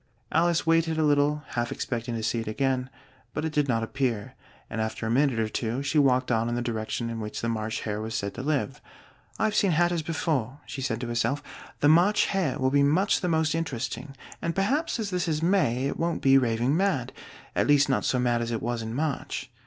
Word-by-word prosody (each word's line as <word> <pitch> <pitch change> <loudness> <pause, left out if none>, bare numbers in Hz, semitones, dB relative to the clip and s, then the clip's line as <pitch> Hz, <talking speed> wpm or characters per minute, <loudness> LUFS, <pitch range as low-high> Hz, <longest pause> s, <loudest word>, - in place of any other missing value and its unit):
Alice 170 +1 +2
waited 165 0 +2
a 160 - +2
little, 150 0 +2
half 120 0 -2
expecting 120 -1 -3
to 110 - -3
see 115 +1 0
it 115 - -5
again, 130 +2 0 0.5
but 150 - -1
it 160 - -3
did 150 -2 +2
not 115 -3 +1
appear, 120 -3 -2 0.3
and 110 - -3
after 110 +1 -3
a 110 - -1
minute 135 0 +2
or 110 - +1
two 115 +4 -2
she 145 +2 +2
walked 130 -3 +3
on 115 0 +1
in 120 - -1
the 120 - -1
direction 115 0 -3
in 115 -1 -4
which 105 -1 -5
the 115 - -2
March 110 -1 -2
Hare 105 -1 -3
was 110 +1 -4
said 100 0 -2
to 125 - -6
live. 140 -2 -1 0.6
"I've 215 -1 +1
seen 200 - +3
hatters 175 +1 +2
before," 150 -5 -2
she 135 - -6
said 115 -3 -1
to 125 - -3
herself: 120 +4 0 0.4
"the 145 - +5
March 175 +7 +5
Hare 185 -9 0
will 130 -2 +1
be 140 0 +4
much 170 +9 +3
the 180 - 0
most 160 -1 +2
interesting, 140 -2 -4 0.3
and 170 0 -2
perhaps 260 +9 0
as 210 -3 -2
this 180 0 -1
is 155 -1 -1
May 145 -9 +2
it 140 - -2
won't 170 0 -1
be 135 0 +6
raving 125 +1 +2
mad 185 -10 0 0.4
at - - +2
least 145 0 +5
not 135 - +1
so 130 - +1
mad 120 -1 +1
as 115 - -2
it 115 -1 -3
was 120 0 -2
in 110 +1 -5
March." 140 -2 -3
135 Hz, 225 wpm, -27 LUFS, 115-160 Hz, 0.6 s, be